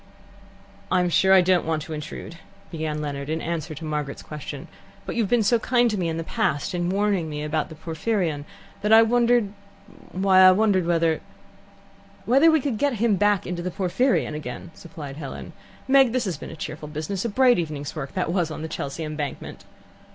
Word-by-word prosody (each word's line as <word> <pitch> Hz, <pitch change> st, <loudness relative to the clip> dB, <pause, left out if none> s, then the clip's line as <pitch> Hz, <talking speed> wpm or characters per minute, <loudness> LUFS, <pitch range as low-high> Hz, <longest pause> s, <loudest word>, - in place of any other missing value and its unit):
"I'm 180 Hz, -1 st, +2 dB
sure 180 Hz, +4 st, +3 dB
I 190 Hz, -1 st, +8 dB
don't 180 Hz, -1 st, +3 dB
want 160 Hz, -1 st, -1 dB
to 160 Hz, -, -7 dB
intrude," 155 Hz, +2 st, -7 dB, 0.3 s
began 155 Hz, -2 st, -3 dB
Leonard, 140 Hz, -1 st, -4 dB
in 160 Hz, +1 st, -1 dB
answer 160 Hz, -1 st, -4 dB
to 160 Hz, +3 st, -8 dB
Margaret's 150 Hz, -2 st, -4 dB
question. 145 Hz, -2 st, -7 dB, 0.4 s
"But -, -, -5 dB
you 235 Hz, -, +1 dB
have 205 Hz, -, -1 dB
been 240 Hz, -2 st, +3 dB
so 230 Hz, +3 st, +3 dB
kind 240 Hz, 0 st, +2 dB
to 210 Hz, -, -2 dB
me 170 Hz, -2 st, 0 dB
in 160 Hz, -, -3 dB
the 165 Hz, -, -3 dB
past 190 Hz, -3 st, -1 dB
in 175 Hz, 0 st, -1 dB
warning 195 Hz, -4 st, 0 dB
me 150 Hz, 0 st, -4 dB
about 150 Hz, 0 st, -1 dB
the 160 Hz, -, -10 dB
Porphyrion 160 Hz, -1 st, -2 dB, 0.4 s
that 210 Hz, +1 st, 0 dB
I 225 Hz, +1 st, +9 dB
wondered 235 Hz, -2 st, +2 dB, 0.6 s
why, 190 Hz, 0 st, +3 dB
I 185 Hz, 0 st, +9 dB
wondered 190 Hz, -3 st, +2 dB
whether 165 Hz, -2 st, +1 dB, 0.5 s
" 200 Hz, 0 st, -27 dB
"Whether 275 Hz, +7 st, +5 dB
we 315 Hz, -2 st, +3 dB
could 250 Hz, -6 st, -2 dB
get 285 Hz, -2 st, +2 dB
him 225 Hz, -1 st, +2 dB
back 205 Hz, 0 st, +2 dB
into 175 Hz, -1 st, -4 dB
the 180 Hz, -, -3 dB
Porphyrion 195 Hz, -, 0 dB
again," 150 Hz, +2 st, -7 dB
supplied 150 Hz, -5 st, -9 dB
Helen. 140 Hz, -4 st, -7 dB, 0.3 s
"Meg, 265 Hz, -3 st, +5 dB
this 255 Hz, -2 st, 0 dB
has 185 Hz, -4 st, -2 dB
been 145 Hz, -, -9 dB
a -, -, -8 dB
cheerful 155 Hz, -1 st, -6 dB
business. 155 Hz, +6 st, -4 dB
A 235 Hz, -, -1 dB
bright 250 Hz, 0 st, +4 dB
evening's 150 Hz, -3 st, -4 dB
work 140 Hz, -3 st, -6 dB
that 180 Hz, -2 st, -1 dB
was 175 Hz, -4 st, +1 dB
on 155 Hz, 0 st, -5 dB
Chelsea 145 Hz, +1 st, -5 dB
Embankment." 150 Hz, -2 st, -6 dB
175 Hz, 200 wpm, -24 LUFS, 155-210 Hz, 0.6 s, I